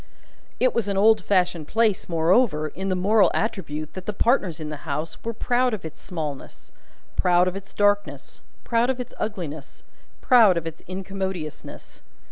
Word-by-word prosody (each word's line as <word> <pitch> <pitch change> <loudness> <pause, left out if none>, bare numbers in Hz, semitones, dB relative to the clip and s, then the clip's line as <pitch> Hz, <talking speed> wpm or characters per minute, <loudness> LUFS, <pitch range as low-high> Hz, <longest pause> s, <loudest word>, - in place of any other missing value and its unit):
It 255 0 +3
was 230 -4 0
an 200 -1 -1
old 215 0 +5
fashioned 180 -5 +1
place, 220 -3 +1
moreover, 165 -1 +2
in 190 +5 -5
the 185 - +1
moral 200 +3 +4
attribute 155 -8 -3
that 185 -1 -9
the 210 - -1
partners 195 - +1
in 155 -1 -5
the 150 - -5
House 155 +3 -4
were 230 - -2
proud 245 +1 +1
of 185 - -10
its 160 - -9
smallness, 155 -6 -7 0.4
proud 180 0 +3
of 185 - -2
its 195 0 -8
darkness, 205 0 0 0.2
proud 235 +1 +1
of 260 -1 -1
its 250 - -6
ugliness, 170 -9 -5 0.4
proud 225 -8 +5
of 165 - -3
its 165 0 -7
incommodiousness. 190 -3 -6
190 Hz, 165 wpm, -24 LUFS, 165-215 Hz, 0.4 s, old